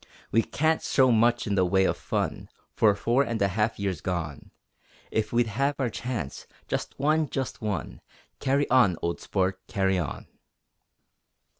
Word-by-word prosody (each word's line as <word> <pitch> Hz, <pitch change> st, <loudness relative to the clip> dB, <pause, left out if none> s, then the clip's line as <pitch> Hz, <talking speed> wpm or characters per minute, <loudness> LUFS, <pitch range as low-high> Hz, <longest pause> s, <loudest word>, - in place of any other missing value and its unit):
We 115 Hz, -, +4 dB
can't 160 Hz, +6 st, 0 dB
show 130 Hz, -2 st, +3 dB
much 120 Hz, +1 st, +3 dB
in 105 Hz, -, -1 dB
the 95 Hz, -2 st, +3 dB
way 95 Hz, +1 st, +3 dB
of -, -, +1 dB
fun -, -, -3 dB, 0.3 s
For 105 Hz, -2 st, +4 dB
four 120 Hz, +6 st, +2 dB
and 115 Hz, -5 st, -1 dB
a 100 Hz, -, +2 dB
half 105 Hz, +4 st, 0 dB
years 95 Hz, -5 st, -2 dB
gone; 80 Hz, -6 st, -4 dB, 0.6 s
If 110 Hz, -1 st, -1 dB
we'd 120 Hz, 0 st, +3 dB
had 140 Hz, +6 st, 0 dB
our 125 Hz, -4 st, -1 dB
chance 110 Hz, -, -5 dB, 0.2 s
just -, -, -3 dB
one! 155 Hz, +1 st, +2 dB
just 135 Hz, -2 st, -4 dB
one! 105 Hz, -5 st, -3 dB, 0.4 s
Carry 140 Hz, +2 st, +1 dB
on, 120 Hz, -10 st, +5 dB
old 85 Hz, 0 st, -2 dB
Sport, 95 Hz, -1 st, -1 dB
carry 95 Hz, -2 st, +1 dB
on! 80 Hz, -6 st, -4 dB
110 Hz, 160 wpm, -27 LUFS, 95-130 Hz, 0.6 s, on